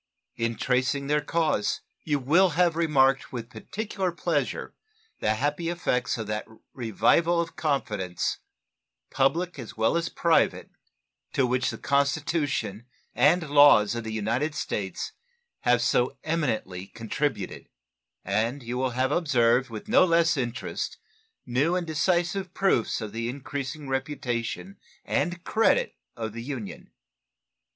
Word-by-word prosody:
In 115 0 -1
tracing 130 +3 0
their 150 +1 +2
causes 155 -8 0 0.2
you 150 -2 +1
will 165 +8 +4
have 175 -2 +4
remarked 135 -5 +3
with 120 -2 -6
particular 195 - -3
pleasure 170 - -2 0.5
the 110 - +1
happy 145 +7 -1
effects 170 -10 0
of 110 - -4
that 105 0 -3 0.3
revival 165 - +2
of 170 -1 -2
confidence, 110 - -1 0.7
public 160 +5 +1
as 115 -3 -8
well 110 +7 +2
as 170 0 0
private, 170 -1 +1 0.6
to 135 - +3
which 125 +1 +1
the - - -5
Constitution 140 - 0 0.3
and 165 +3 +3
laws 145 -8 +6
of 120 -1 -4
the 110 - -5
United 115 +8 -1
States - - -3 0.5
have 120 -1 +3
so 125 +1 +1
eminently 110 - -2
contributed; 115 -1 -3 0.6
and 115 +7 0
you 120 +2 -3
will 130 -2 -1
have 130 +1 +2
observed 125 -6 +3
with 110 -2 -8
no 250 +6 +6
less 165 -2 +3
interest 125 -2 -3 0.5
new 135 +8 +1
and 180 -1 -1
decisive 175 +3 0
proofs 190 - +1
of 110 -2 -5
the 115 +2 -3
increasing 140 +2 -5
reputation 135 - -3 0.3
and 175 0 -1
credit 470 - +2 0.2
of 110 -2 -4
the 115 - -6
nation. 110 -6 -8
135 Hz, 130 wpm, -27 LUFS, 115-165 Hz, 0.7 s, laws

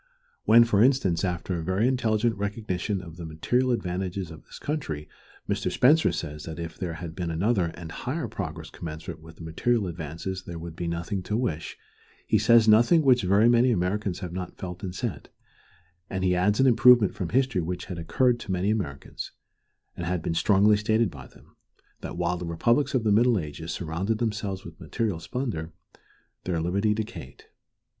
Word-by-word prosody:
When, 115 +1 +8
for 105 -3 +2
instance, 125 -11 +2
after 90 0 -2
a - - -4
very 95 +7 +1
intelligent 115 -3 +1
recognition 100 -2 -3
of 85 -2 -11
the 85 - -6
material 120 +12 0
advantages 95 -5 -2
of 80 - -11
this - - -12
country, 105 - -4 0.4
Mr. - - -1
Spencer 150 +6 +4
says 75 -1 -5
that 80 -1 -6
if 85 -1 -6
there 90 -3 -4
had 80 0 -7
been 85 -1 -3
another 95 +4 +1
and 85 -1 -8
higher - - -3
progress - - -6
commensurate 80 -1 -7
with 80 0 -13
the 80 - -11
material 105 +7 0
advance 80 -2 -6 0.2
there 85 -2 -8
would 80 0 -8
be 85 0 -4
nothing 85 +3 -2
to 105 +4 -2
wish, 110 -11 -3 0.5
he - - +3
says 115 -1 +5
nothing 120 +10 +6
which 130 -3 +5
very 100 +4 +4
many 120 +1 +5
Americans 95 -2 -1
have 90 -3 -5
not 90 0 -6
felt 90 -1 -7
and 90 -1 -5
said, 110 - -4 0.8
and 95 -1 -3
he 90 -1 +3
adds 100 +4 +2
an 135 - +5
improvement 120 -3 +6
from 90 -4 -4
history 130 -5 +1
which 90 +2 -4
had 90 -2 -6
occurred 120 +9 +2
to 100 - -6
many 95 +3 +1
Americans, 80 -11 -4 0.6
and 85 - -4
had 90 -2 -1
been 80 - -1
strongly 105 +4 +4
stated 110 -1 +1
by 65 -3 -10
them, - - -21 0.4
that - - -7
while 90 0 0
the 90 - -5
republics 115 - +1
of 125 - +2
the 110 - +2
Middle 115 +2 +4
Ages 80 -1 -5
surrounded 90 +6 -2
themselves 105 -4 -3
with 85 -1 -11
material 110 -8 -2
splendor, 85 - -4 0.7
their 90 -2 -1
liberty 100 +6 +1
decayed. 105 -11 -7
95 Hz, 185 wpm, -26 LUFS, 85-115 Hz, 0.8 s, When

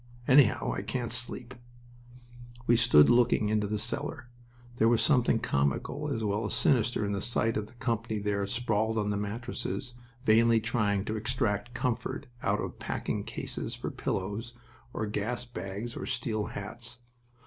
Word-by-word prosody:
Anyhow, 130 -4 +5
I - - -3
can't 125 -3 -3
sleep." 120 +1 -3 1.1
We 120 - +5
stood 115 -11 +6
looking 120 -3 +4
into 105 -1 +1
the 105 +1 -1
cellar. 120 +4 -3 0.5
There 115 - +4
was 115 -1 +4
something 125 -6 +4
comical 70 - -1
as 115 -5 -1
well 105 +1 0
as - - -2
sinister 120 -4 +2
in 100 - -1
the 100 -1 -1
sight 115 0 +1
of 105 -1 -2
the 120 - -18
company 115 -2 -1
there 100 -1 -1
sprawled 110 0 0
on 105 -1 +1
the - - 0
mattresses, 115 +3 -4 0.3
vainly 115 +1 +5
trying 105 -3 0
to 110 +1 -2
extract 110 0 -1
comfort 125 +3 -2 0.2
out - - +1
of - - -5
packing - - -2
cases - - -4
for - - -4
pillows, 105 +5 -3 0.4
or 110 - -2
gas 110 +4 -2
bags 105 +1 -6
on - - -5
steel 115 -4 -1
hats. 115 +3 -6
115 Hz, 160 wpm, -30 LUFS, 105-120 Hz, 1.1 s, stood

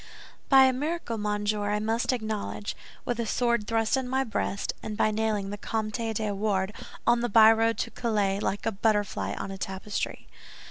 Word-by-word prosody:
"By 270 -1 +8
a 260 0 +5
miracle, 290 -4 -2
monsieur, 210 0 -1
I 210 - +1
must 225 +4 0
acknowledge, 210 - -3 0.3
with 240 -1 -2
a 230 - -1
sword 235 -2 +1
thrust 225 +1 +2
in 260 -2 -2
my 265 +1 +1
breast, 215 -4 -2
and 210 -1 -5
by 215 - +3
nailing 210 -2 -1
the 205 - -6
Comte 215 0 -2 0.2
de 215 -1 -1
Wardes 195 -1 0 0.3
on 235 0 +4
the 240 - 0
byroad 225 +1 +6
to - - -2
Calais, 205 -4 0
like 205 0 -2
a 225 - +2
butterfly 210 0 0
on 195 - -5
a 195 - -7
tapestry." 195 +2 -4
215 Hz, 180 wpm, -27 LUFS, 205-235 Hz, 0.3 s, By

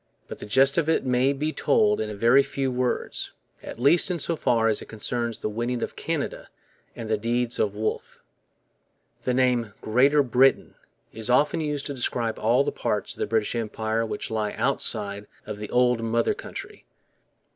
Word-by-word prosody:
But - - -8
the - - -7
gist 135 +7 +4
of 160 -1 0
it 160 - +1
may 130 +1 +2
be 150 +3 -2
told 210 -1 +2
in 110 - -3
a 105 - -6
very 120 +6 +5
few 135 -1 -2
words, 125 0 -2 0.3
at - - -8
least 150 +9 +4
in 180 - -1
so 165 +1 -1
far 120 -6 +2
as 110 -2 +1
it - - -10
concerns 115 +1 -3
the - - -3
winning 120 +3 -2
of - - -5
Canada - - -4 0.5
and 115 - -6
the 110 -1 0
deeds 120 +2 -1
of 105 -1 0
Wolfe. 110 +1 -4 1.0
The 125 - -1
name 125 -5 +1
'Greater 135 +6 +3
Britain' 130 +2 +3 0.4
is 110 +1 -4
often 150 +6 +3
used 150 -2 -3
to 145 - -3
describe 120 -3 -2
all 120 +5 +3
the - - -1
parts - - -2
of - - -17
the - - -1
British 110 -1 0
Empire 110 -1 -2
which 115 - -4
lie 110 -2 -1
outside 100 0 -2 0.2
of 105 -1 -6
the 105 - -6
old 125 -1 +2
mother 115 +1 +1
country. - - -9
120 Hz, 185 wpm, -25 LUFS, 110-135 Hz, 1.0 s, very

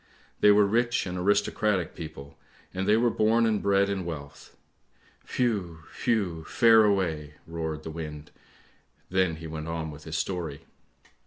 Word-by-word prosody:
" - - -33
They 105 - +7
were 105 0 +6
rich 120 +4 +1
and 90 -1 -4
aristocratic 100 0 +1
people, 70 -3 -9 0.4
and 95 +1 -2
they 105 - +5
were 120 0 +3
born 115 +2 +3
and 110 -2 +1
bred 100 0 +3
in 100 -2 -2
wealth! 70 -4 -8 0.8
Whew! 100 -10 -1 0.2
whew! 95 -9 0
fare 115 -2 +5
away! 80 -7 0
" - - -34
roared 80 -1 -3
the 80 - -6
wind, 75 -2 -7 0.8
then 95 -3 +2
he 80 +1 -10
went 80 0 -6
on 80 -1 -3
with 75 +1 -12
his 80 -1 -3
story. 85 -6 -3
90 Hz, 160 wpm, -27 LUFS, 80-105 Hz, 0.8 s, They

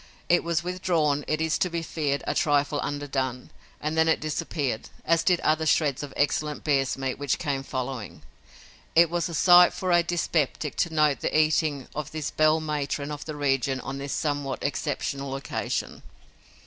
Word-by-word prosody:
It 175 - +4
was 170 0 0
withdrawn, 170 -5 0
it 155 - 0
is 160 -1 0
to 180 - +1
be 170 -1 -3
feared, 145 -3 -2
a - - 0
trifle 145 -3 +1
underdone, 135 -3 -3 0.3
and 155 +1 -2
then 160 0 +3
it 160 - +3
disappeared, 150 -6 -3 0.2
as 165 0 +3
did 180 -2 +2
other 155 +1 +1
shreds 145 -3 +2
of 145 -2 -6
excellent 150 +1 0
bear's 135 -4 +1
meat 135 -1 -3
which 145 -2 0
came 140 -2 -2
following. 130 -4 -5 0.7
It 170 0 +6
was 175 0 -1
a 170 - -5
sight 175 +2 +7
for 185 -1 -1
a 175 0 +5
dyspeptic 165 -4 -1
to 170 - +1
note 150 -3 +2
the - - 0
eating 155 -3 +1
of 150 0 -5
this 155 -2 -3
belle 155 +1 +3
matron 150 -1 -3
of 145 -1 -6
the 155 - -5
region 135 -2 0
on 135 +2 -6
this 140 0 -5
somewhat 145 -3 -2
exceptional 140 -1 -2
occasion. 135 - -3
150 Hz, 175 wpm, -26 LUFS, 140-160 Hz, 0.7 s, sight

